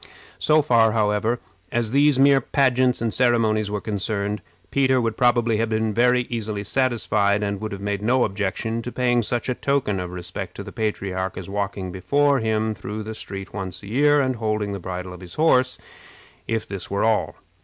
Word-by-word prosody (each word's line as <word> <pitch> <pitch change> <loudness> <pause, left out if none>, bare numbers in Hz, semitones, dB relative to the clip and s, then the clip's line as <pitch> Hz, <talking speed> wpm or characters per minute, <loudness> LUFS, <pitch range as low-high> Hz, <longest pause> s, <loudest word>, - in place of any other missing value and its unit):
So 155 0 +4
far, 115 -4 +4
however, 110 +2 +1 0.3
as 120 -2 0
these 140 +1 +4
mere 135 0 +5
pageants 130 -2 +2
and 115 - 0
ceremonies 115 -4 +2
were 105 0 -2
concerned, 105 -1 -2 0.3
Peter 130 -2 +3
would 115 -2 -1
probably 120 -3 +3
have 115 +1 0
been 110 -1 0
very 125 +2 +3
easily 110 -4 -4
satisfied, 105 -4 +1
and 100 -1 -2
would 110 - -4
have 100 -1 -6
made 100 0 -2
no 125 +4 +3
objection 105 +3 -2
to 125 - -6
paying 125 -1 +2
such 120 +2 -2
a 130 - +1
token 125 -7 0
of 90 -1 -5
respect 90 +1 -6
to 100 - -6
the - - -9
patriarch 95 -4 -3
as 95 +1 -7
walking 100 -2 -3
before 140 +10 +2
him 110 -1 0
through 105 +1 -6
the 110 +1 -6
street 100 -2 -8
once 95 -1 -6
a - - -9
year, 145 +5 +4
and 130 -2 -1
holding 110 -2 -1
the 100 - -4
bridle 90 0 -6
of 90 - -11
his 90 -1 -9
horse, 130 -5 +3 0.7
if 115 -1 -2
this 100 -3 -6
were 100 0 0
all. 110 -1 +1
110 Hz, 190 wpm, -23 LUFS, 100-125 Hz, 0.7 s, mere